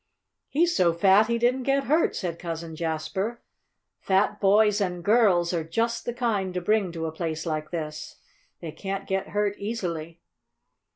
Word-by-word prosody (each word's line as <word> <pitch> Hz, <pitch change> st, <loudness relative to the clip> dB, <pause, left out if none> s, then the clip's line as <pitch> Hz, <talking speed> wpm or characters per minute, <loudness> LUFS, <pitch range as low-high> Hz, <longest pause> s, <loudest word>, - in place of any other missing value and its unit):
"He's 345 Hz, +4 st, +2 dB
so 170 Hz, -2 st, +3 dB
fat 195 Hz, +5 st, +5 dB
he 235 Hz, 0 st, +1 dB
didn't 245 Hz, +3 st, +1 dB
get 275 Hz, +2 st, +1 dB
hurt," 310 Hz, +4 st, +2 dB
said 170 Hz, -3 st, -4 dB
Cousin 165 Hz, -1 st, -5 dB
Jasper. 165 Hz, +8 st, -3 dB, 0.6 s
"Fat 200 Hz, +2 st, +1 dB
boys 210 Hz, +1 st, +4 dB
and 180 Hz, -3 st, -2 dB
girls 195 Hz, -5 st, +3 dB
are 165 Hz, -2 st, 0 dB
just 225 Hz, +9 st, -1 dB
the 240 Hz, -, -2 dB
kind 205 Hz, -7 st, -1 dB
to -, -, +1 dB
bring 200 Hz, 0 st, +1 dB
to 165 Hz, -1 st, -4 dB
a 160 Hz, -, -3 dB
place 160 Hz, 0 st, -4 dB
like 155 Hz, -2 st, -3 dB
this. 155 Hz, -2 st, -5 dB, 0.5 s
They 165 Hz, -3 st, -5 dB
can't 195 Hz, +4 st, -5 dB
get 190 Hz, 0 st, -2 dB
hurt 205 Hz, -1 st, -1 dB
easily." 170 Hz, -6 st, -4 dB
190 Hz, 165 wpm, -26 LUFS, 165-220 Hz, 0.6 s, fat